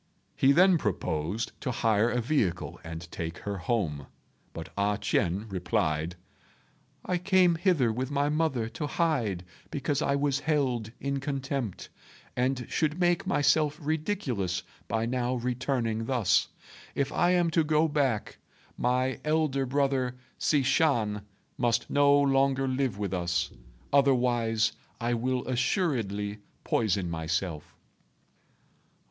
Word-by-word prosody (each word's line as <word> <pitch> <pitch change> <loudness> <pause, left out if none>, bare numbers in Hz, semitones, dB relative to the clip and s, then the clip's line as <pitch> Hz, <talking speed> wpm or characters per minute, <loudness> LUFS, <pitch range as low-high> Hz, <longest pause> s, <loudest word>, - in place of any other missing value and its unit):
He 135 - +4
then 180 +3 +5
proposed 90 - -2
to 135 - -2
hire 115 -2 +2
a 125 0 0
vehicle 110 - -1
and 80 0 -6
take 85 0 -5
her 100 -1 -5
home; 85 - -1 0.4
but - - -7
A 100 0 +1
ch'ien 95 0 0
replied, 85 -3 -1 0.9
"I 180 -1 0
came 185 -1 +4
hither 165 - +2
with 130 +3 -2
my 145 0 +1
mother 150 -7 0
to 150 +5 -4
hide 125 - 0 0.2
because 145 0 -1
I 140 -3 +1
was 140 -1 +1
held 135 -7 0
in 140 0 -2
contempt, 135 -5 -3 0.5
and 125 0 0
should 155 +2 0
make 175 0 +2
myself 150 -3 +2
ridiculous 150 - -2 0.2
by 110 0 0
now 125 +1 -1
returning 120 -2 -1
thus. 120 -9 +2 0.5
If 140 -1 0
I 175 0 +3
am 175 -2 +2
to 165 -1 +3
go 155 +1 +3
back, 140 -8 -1 0.4
my 125 +2 +1
elder 150 -4 +1
brother 135 -2 +1 0.2
Hsi 145 -3 +2
Shan 110 -8 +2 0.4
must 120 -1 +1
no 145 0 +5
longer 135 -1 +2
live 130 -5 0
with 100 -2 -3
us; 90 0 0 0.4
otherwise, 120 -5 +3 0.3
I 120 +1 0
will 125 +2 -1
assuredly 120 - 0 0.2
poison 100 -4 +1
myself." 80 0 -3
125 Hz, 125 wpm, -28 LUFS, 105-145 Hz, 0.9 s, then